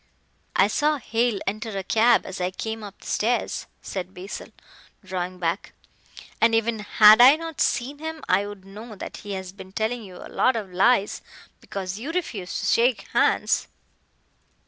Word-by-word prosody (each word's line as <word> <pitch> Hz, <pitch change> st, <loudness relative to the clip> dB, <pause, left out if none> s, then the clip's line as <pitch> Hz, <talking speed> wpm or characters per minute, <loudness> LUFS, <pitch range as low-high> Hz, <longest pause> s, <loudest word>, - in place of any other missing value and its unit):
"I -, -, +5 dB
saw 300 Hz, 0 st, +1 dB
Hale 230 Hz, -3 st, 0 dB
enter 215 Hz, +1 st, -3 dB
a 195 Hz, -, -3 dB
cab 225 Hz, +5 st, +4 dB
as 190 Hz, -1 st, -6 dB
I 180 Hz, -, +1 dB
came 220 Hz, +4 st, -5 dB
up 200 Hz, -1 st, -10 dB
the -, -, -15 dB
stairs," 235 Hz, +3 st, -1 dB, 0.2 s
said 185 Hz, -1 st, -5 dB
Basil, 185 Hz, +4 st, -7 dB, 0.6 s
drawing 185 Hz, -1 st, -4 dB
back; 170 Hz, +2 st, -2 dB, 0.7 s
"and 225 Hz, 0 st, +5 dB
even 225 Hz, 0 st, +1 dB
had 210 Hz, +1 st, +7 dB
I 260 Hz, +4 st, +9 dB
not 325 Hz, -1 st, -6 dB
seen 275 Hz, +4 st, 0 dB
him 320 Hz, 0 st, -6 dB
I 195 Hz, +2 st, +2 dB
would 205 Hz, -2 st, -10 dB
know 215 Hz, +3 st, -10 dB
that -, -, -7 dB
he 205 Hz, -1 st, -7 dB
has 190 Hz, -1 st, -5 dB
been 190 Hz, -1 st, -12 dB
telling 220 Hz, +4 st, -2 dB
you 185 Hz, -3 st, -11 dB
a -, -, -10 dB
lot 255 Hz, -, +2 dB
of 200 Hz, -5 st, -5 dB
lies 200 Hz, +2 st, +3 dB, 0.4 s
because 190 Hz, 0 st, -5 dB
you 280 Hz, +8 st, -4 dB
refuse 230 Hz, -, -3 dB
to -, -, -3 dB
shake 240 Hz, +1 st, +2 dB
hands." -, -, +2 dB
215 Hz, 170 wpm, -24 LUFS, 190-240 Hz, 0.7 s, I